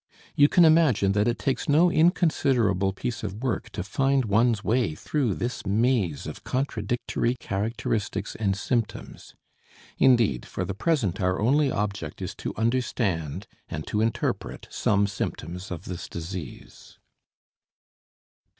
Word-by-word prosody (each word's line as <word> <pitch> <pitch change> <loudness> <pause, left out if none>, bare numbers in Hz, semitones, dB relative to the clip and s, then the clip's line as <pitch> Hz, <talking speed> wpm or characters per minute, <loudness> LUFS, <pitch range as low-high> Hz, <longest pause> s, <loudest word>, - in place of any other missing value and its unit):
You 145 - +6
can 175 - +6
imagine 155 -12 +4
that 105 +2 +2
it 120 - +1
takes 135 - -2
no 165 +5 +5
inconsiderable 130 - +2
piece 120 +5 -4
of 105 +3 -5
work 130 -4 -2
to - - -3
find 135 +6 +1
one's 110 +1 +2
way 115 -9 +1
through 130 - -1
this 120 +1 -3
maze 105 - +1
of - - -8
contradictory 120 -1 -1
characteristics 110 -2 -2
and 100 -3 0
symptoms. 115 +2 -3 0.6
Indeed, 115 - +4
for - - -4
the 100 - -3
present 110 - 0
our 90 0 +1
only 140 +6 +3
object 100 -7 -3
is - - -4
to - - -4
understand 100 - -1 0.2
and 75 0 -5
to 105 - -1
interpret 115 0 -2
some 100 -1 +2
symptoms 90 -2 -5
of 90 -3 -6
this 90 -2 -6
disease. 85 -3 -8
110 Hz, 130 wpm, -26 LUFS, 95-130 Hz, 0.6 s, You